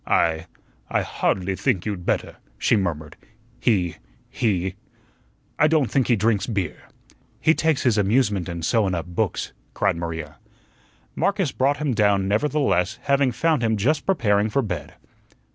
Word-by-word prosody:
"I 80 Hz, 0 st, +1 dB, 0.4 s
I -, -, +1 dB
hardly 95 Hz, 0 st, -1 dB
think 90 Hz, -1 st, 0 dB
you'd 100 Hz, -5 st, -4 dB
better," -, -, -1 dB, 0.2 s
she -, -, +2 dB
murmured; 80 Hz, -7 st, -2 dB, 0.4 s
"he 90 Hz, -8 st, +1 dB, 0.3 s
he 95 Hz, -5 st, 0 dB, 0.9 s
I 150 Hz, -, +6 dB
don't 155 Hz, -5 st, +2 dB
think 135 Hz, -3 st, +2 dB
he 120 Hz, -, +4 dB
drinks 110 Hz, -1 st, +1 dB
beer." 100 Hz, -8 st, -3 dB, 0.5 s
"He 160 Hz, -, +4 dB
takes 160 Hz, -4 st, +1 dB
his 115 Hz, -5 st, +3 dB
amusement 100 Hz, -3 st, +1 dB
in 85 Hz, -1 st, -5 dB
sewin' 100 Hz, -1 st, +1 dB
up 85 Hz, -, -3 dB
books," 90 Hz, -1 st, -2 dB, 0.2 s
cried -, -, +1 dB
Maria. 80 Hz, -3 st, -5 dB, 0.8 s
Marcus 195 Hz, -7 st, 0 dB
brought 140 Hz, +2 st, +1 dB
him 145 Hz, -3 st, -1 dB
down, 100 Hz, -3 st, +2 dB
nevertheless, 115 Hz, -3 st, +1 dB
having 140 Hz, -2 st, +2 dB
found 155 Hz, +2 st, +1 dB
him 110 Hz, -2 st, +1 dB
just 145 Hz, +10 st, 0 dB
preparing 105 Hz, -, +2 dB
for 135 Hz, +5 st, +1 dB
bed. 85 Hz, -9 st, -5 dB
105 Hz, 145 wpm, -23 LUFS, 90-135 Hz, 0.9 s, I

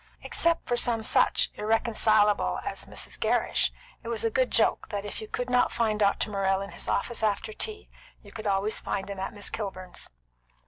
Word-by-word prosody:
Except 335 Hz, 0 st, +1 dB
for 245 Hz, -, +1 dB
some 235 Hz, -2 st, +1 dB
such -, -, +3 dB
irreconcilable 215 Hz, -, +2 dB
as -, -, -3 dB
Mrs. 65 Hz, -1 st, -4 dB
Gerrish, -, -, +2 dB, 0.3 s
it -, -, -11 dB
was 230 Hz, -1 st, -1 dB
a 225 Hz, -, +1 dB
good 255 Hz, +2 st, +2 dB
joke 225 Hz, -, +3 dB
that 205 Hz, -1 st, -4 dB
if 205 Hz, -, -5 dB
you 215 Hz, -, -7 dB
could 245 Hz, +3 st, -3 dB
not 250 Hz, 0 st, +3 dB
find 220 Hz, -2 st, 0 dB
Dr. 205 Hz, +1 st, +2 dB
Morrell 195 Hz, -1 st, +1 dB
in 195 Hz, 0 st, -6 dB
his -, -, -5 dB
office 235 Hz, +3 st, -1 dB
after 215 Hz, 0 st, 0 dB
tea, 425 Hz, -, -2 dB, 0.4 s
you -, -, -14 dB
could 220 Hz, -1 st, -6 dB
always 200 Hz, +2 st, +1 dB
find 200 Hz, 0 st, -3 dB
him 195 Hz, -, -6 dB
at 190 Hz, -, -3 dB
Miss 205 Hz, -1 st, -3 dB
Kilburn's. 185 Hz, -4 st, -5 dB
215 Hz, 190 wpm, -28 LUFS, 200-230 Hz, 0.4 s, such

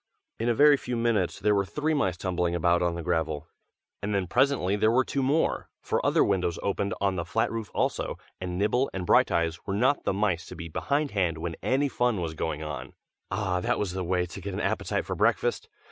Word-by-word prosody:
In 115 Hz, +2 st, 0 dB
a 120 Hz, -, +2 dB
very 145 Hz, +3 st, +7 dB
few 125 Hz, -2 st, -4 dB
minutes 115 Hz, -7 st, +1 dB
there 105 Hz, +1 st, +3 dB
were 100 Hz, -1 st, +2 dB
three 150 Hz, +10 st, -1 dB
mice 95 Hz, -, 0 dB
tumbling 90 Hz, -1 st, -1 dB
about 85 Hz, +1 st, +2 dB
on 85 Hz, -1 st, +1 dB
the 85 Hz, -, -5 dB
gravel, 80 Hz, -3 st, -1 dB, 0.6 s
and 100 Hz, 0 st, -1 dB
then 95 Hz, -2 st, +1 dB
presently 120 Hz, -1 st, +2 dB
there 110 Hz, +1 st, +3 dB
were 125 Hz, +3 st, +3 dB
two 140 Hz, -, -1 dB
more, 145 Hz, +5 st, +1 dB
for -, -, -1 dB
other -, -, +4 dB
windows 90 Hz, -4 st, 0 dB
opened 100 Hz, 0 st, -1 dB
on 95 Hz, -1 st, +1 dB
the 85 Hz, -, -1 dB
flat 90 Hz, +6 st, 0 dB
roof 115 Hz, -2 st, -4 dB
also, -, -, -1 dB, 0.2 s
and 90 Hz, -1 st, -4 dB
Nibble 120 Hz, +7 st, +2 dB
and 90 Hz, -1 st, -3 dB
Brighteyes 85 Hz, -1 st, +3 dB
were 100 Hz, -, -1 dB
not 130 Hz, +7 st, +2 dB
the -, -, +1 dB
mice 95 Hz, -4 st, 0 dB
to -, -, -8 dB
be 85 Hz, -1 st, -7 dB
behindhand 100 Hz, -, 0 dB
when 85 Hz, 0 st, -4 dB
any 135 Hz, +3 st, +2 dB
fun 120 Hz, -5 st, 0 dB
was 80 Hz, -2 st, -3 dB
going 80 Hz, -1 st, -3 dB
on. 70 Hz, -4 st, -6 dB, 0.4 s
Ah! 95 Hz, -4 st, -1 dB
that -, -, 0 dB
was 100 Hz, -4 st, -1 dB
the 95 Hz, 0 st, -3 dB
way 90 Hz, 0 st, +1 dB
to 90 Hz, +3 st, -9 dB
get 100 Hz, 0 st, -5 dB
an -, -, -2 dB
appetite -, -, -1 dB
for -, -, -3 dB
breakfast. -, -, +1 dB
95 Hz, 220 wpm, -27 LUFS, 85-115 Hz, 0.6 s, very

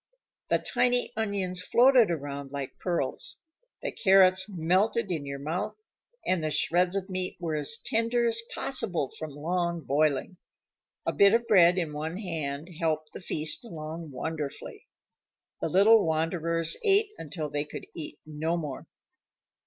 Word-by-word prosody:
The -, -, +4 dB
tiny 245 Hz, -1 st, +1 dB
onions 200 Hz, -4 st, -1 dB
floated 245 Hz, +2 st, +5 dB
around 140 Hz, -4 st, -4 dB
like 140 Hz, -2 st, -6 dB
pearls; 180 Hz, -, -1 dB, 0.4 s
the -, -, -2 dB
carrots 190 Hz, -1 st, +4 dB
melted 190 Hz, +4 st, +1 dB
in 150 Hz, -5 st, -3 dB
your 140 Hz, 0 st, -4 dB
mouth; 155 Hz, +7 st, -3 dB, 0.5 s
and 185 Hz, -3 st, +1 dB
the 155 Hz, -, 0 dB
shreds 175 Hz, +4 st, +2 dB
of 195 Hz, -1 st, -2 dB
meat 185 Hz, -1 st, -3 dB
were 165 Hz, -3 st, -3 dB
as 150 Hz, +9 st, -1 dB
tender 230 Hz, +1 st, +1 dB
as 230 Hz, 0 st, +2 dB
possible 190 Hz, -, -1 dB
from 155 Hz, -, -5 dB
long 170 Hz, +3 st, -2 dB
boiling. 150 Hz, +4 st, 0 dB, 0.7 s
A -, -, 0 dB
bit 200 Hz, +2 st, +6 dB
of 235 Hz, 0 st, +1 dB
bread 180 Hz, -4 st, +6 dB
in 165 Hz, -4 st, -1 dB
one 160 Hz, +4 st, -4 dB
hand 160 Hz, -6 st, -4 dB
helped 155 Hz, -2 st, -1 dB
the -, -, -7 dB
feast 155 Hz, +4 st, -2 dB
along 160 Hz, -5 st, -7 dB
wonderfully. 150 Hz, +1 st, -6 dB, 0.7 s
The -, -, -1 dB
little 210 Hz, +3 st, +6 dB
wanderers 165 Hz, +1 st, 0 dB
ate 415 Hz, 0 st, +4 dB
until 155 Hz, -1 st, -5 dB
they 145 Hz, 0 st, -1 dB
could 150 Hz, -, -8 dB
eat 150 Hz, -2 st, -6 dB
no 155 Hz, +2 st, -2 dB
more. 150 Hz, -5 st, -6 dB
170 Hz, 145 wpm, -28 LUFS, 155-200 Hz, 0.7 s, bit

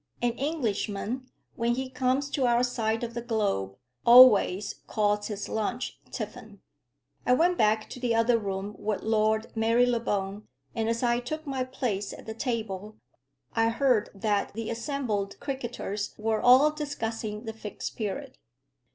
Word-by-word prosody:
An 240 Hz, 0 st, +1 dB
Englishman, 245 Hz, -3 st, -2 dB, 0.3 s
when 235 Hz, 0 st, +1 dB
he 260 Hz, +1 st, -3 dB
comes 260 Hz, +2 st, 0 dB
to 265 Hz, -3 st, +1 dB
our 240 Hz, 0 st, +3 dB
side 225 Hz, -2 st, -1 dB
of 235 Hz, 0 st, -4 dB
the 235 Hz, -, -3 dB
globe, 200 Hz, -, -1 dB, 0.3 s
always 215 Hz, -5 st, +7 dB
calls 210 Hz, -1 st, +1 dB
his 210 Hz, -2 st, -4 dB
lunch 230 Hz, +3 st, -3 dB
tiffin. 215 Hz, -2 st, -7 dB, 0.6 s
I 250 Hz, -, +3 dB
went 345 Hz, +7 st, +3 dB
back 215 Hz, 0 st, +3 dB
to -, -, -7 dB
the 240 Hz, -2 st, +1 dB
other 230 Hz, +1 st, +3 dB
room 200 Hz, 0 st, -4 dB
with 210 Hz, -1 st, -2 dB
Lord 220 Hz, +1 st, +1 dB
Marylebone; 225 Hz, -3 st, +1 dB, 0.3 s
and 225 Hz, 0 st, -1 dB
as 230 Hz, +2 st, -1 dB
I 240 Hz, 0 st, +2 dB
took 310 Hz, +6 st, -5 dB
my 270 Hz, -2 st, -1 dB
place 240 Hz, -6 st, -3 dB
at -, -, -11 dB
the 220 Hz, -, -5 dB
table, 220 Hz, -4 st, -4 dB, 0.6 s
I 225 Hz, 0 st, +3 dB
heard 235 Hz, -2 st, +2 dB
that 205 Hz, 0 st, 0 dB
the 225 Hz, 0 st, -3 dB
assembled 230 Hz, -5 st, -2 dB
cricketers 240 Hz, -6 st, -4 dB
were 220 Hz, 0 st, 0 dB
all 260 Hz, +5 st, +7 dB
discussing 225 Hz, -8 st, -4 dB
the 225 Hz, -2 st, -5 dB
Fixed 215 Hz, -2 st, -6 dB
Period. 250 Hz, +5 st, -5 dB
230 Hz, 150 wpm, -28 LUFS, 210-250 Hz, 0.6 s, always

